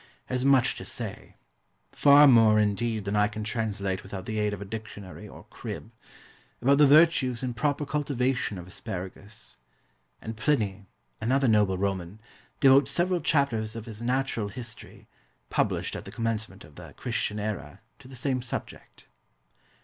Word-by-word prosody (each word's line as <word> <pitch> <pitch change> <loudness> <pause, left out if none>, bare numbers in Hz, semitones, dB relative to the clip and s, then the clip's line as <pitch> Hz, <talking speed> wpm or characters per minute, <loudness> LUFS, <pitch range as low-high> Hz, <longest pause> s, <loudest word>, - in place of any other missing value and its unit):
has 125 0 -2
much 135 -2 +4
to - - -8
say - - -6 0.6
far 145 +1 +7
more, 115 -4 +6
indeed, 105 +1 0
than 100 +1 -1
I 105 0 +4
can 110 0 -6
translate 105 -4 -2
without 95 -1 -7
the 110 -1 -3
aid 105 0 +1
of 105 - -5
a 100 - -6
dictionary 105 -2 -8
or - - -12
"crib" - - -7 0.7
about 140 +3 +3
the 150 - +7
virtues 140 -5 +4
and 125 -2 -3
proper 145 +4 0
cultivation 130 -6 -1
of 90 - -8
asparagus; 95 +4 -8 0.6
and 110 0 -6
Pliny, 105 -6 0 0.3
another 135 +3 +2
noble 105 -4 +3
Roman, 95 0 -3 0.4
devotes 135 0 +6
several 175 0 +1
chapters 115 -7 +1
of 115 -1 -6
his 110 -2 -8
Natural 125 -3 -1
History 120 +3 -9 0.4
(published - - 0
at - - -7
the - - -8
commencement 110 -3 -3
of 70 0 -17
the - - -11
Christian 105 - -2
era) 105 -1 -5 0.2
to - - -14
the 130 - -11
same 130 0 -1
subject. 120 - -7
110 Hz, 155 wpm, -27 LUFS, 105-130 Hz, 0.7 s, far